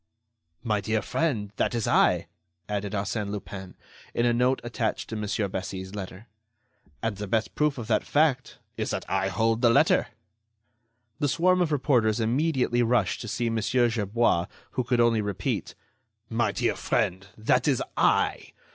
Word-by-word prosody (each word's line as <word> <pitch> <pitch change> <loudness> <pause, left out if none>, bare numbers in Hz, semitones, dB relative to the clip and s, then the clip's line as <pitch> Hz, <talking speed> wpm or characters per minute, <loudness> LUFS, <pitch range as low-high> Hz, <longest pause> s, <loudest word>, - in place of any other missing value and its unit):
"My 105 -4 0
Dear 110 +1 -1
Friend! 115 -12 -1
that - - 0
is 115 - -1
I," - - +3 0.4
added 105 0 -3
Arsène 100 +1 -2
Lupin, 95 -2 -7 0.4
in 120 - +2
a 120 - +3
note 125 +2 +2
attached 120 -2 -2
to - - -3
Mon. 105 -2 -2
Bessy's 95 0 -5
letter. 100 +1 -7 0.8
"And 115 -3 -1
the 105 0 -5
best 110 +2 0
proof 150 -2 +1
of 120 - -5
that 110 - +1
fact 145 -3 +1 0.2
is - - -2
that - - -3
I 95 0 0
hold 115 +4 +1
the 120 - +5
letter." 115 - +4 1.1
The 145 - +1
swarm 180 +5 +3
of 170 -3 +1
reporters 125 -6 +2
immediately 125 +1 +1
rushed 120 +1 +1
to 115 - -6
see 115 +2 -1
Mon. 115 -1 0
Gerbois, 115 -5 +1 0.2
who 130 - -1
could 125 0 0
only 115 -2 +4
repeat: 100 -2 -3 0.6
"My 115 -2 +1
Dear - - 0
Friend! 95 +2 -1
that 125 +4 +2
is 135 -4 +2
I.... - - +1
115 Hz, 160 wpm, -26 LUFS, 105-125 Hz, 1.1 s, the